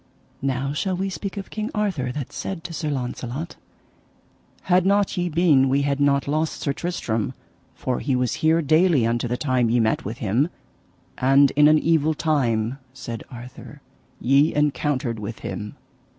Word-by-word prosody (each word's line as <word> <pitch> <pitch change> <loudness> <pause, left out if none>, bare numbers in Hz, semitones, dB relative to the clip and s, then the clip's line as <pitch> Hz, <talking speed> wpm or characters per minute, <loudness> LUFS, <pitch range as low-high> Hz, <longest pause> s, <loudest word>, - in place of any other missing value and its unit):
Now 135 +1 -1
shall 185 +5 -1
we 195 +1 -2
speak 195 +2 -5
of 195 - -6
King 215 +1 -3
Arthur, 185 -12 -1
that 140 0 -6
said 185 -4 -5
to 175 -1 -7
Sir 155 -1 -3
Launcelot: 130 +3 -4 1.1
Had 180 0 +3
not 200 +1 +2
ye 175 0 -1
been 150 -5 +4
we 140 +1 +2
had 140 0 0
not 140 -1 +2
lost 155 +2 -1
Sir 140 - 0
Tristram, 115 - -2 0.4
for 125 - -2
he 135 - 0
was 125 -2 0
here 160 +1 +3
daily 155 -3 +4
unto 120 +1 0
the 120 +1 -2
time 130 -5 +1
ye 120 +1 +3
met 110 -1 +1
with 110 +4 -5
him, 125 - +1 0.7
and 135 +2 +5
in 150 +1 +5
an 155 0 +6
evil 160 -1 +2
time, 130 -6 0 0.2
said 115 -3 -6
Arthur, 125 0 -11 0.4
ye 140 +5 +3
encountered 145 -5 0
with 105 +2 -6
him. 105 0 -6
140 Hz, 165 wpm, -23 LUFS, 125-165 Hz, 1.1 s, an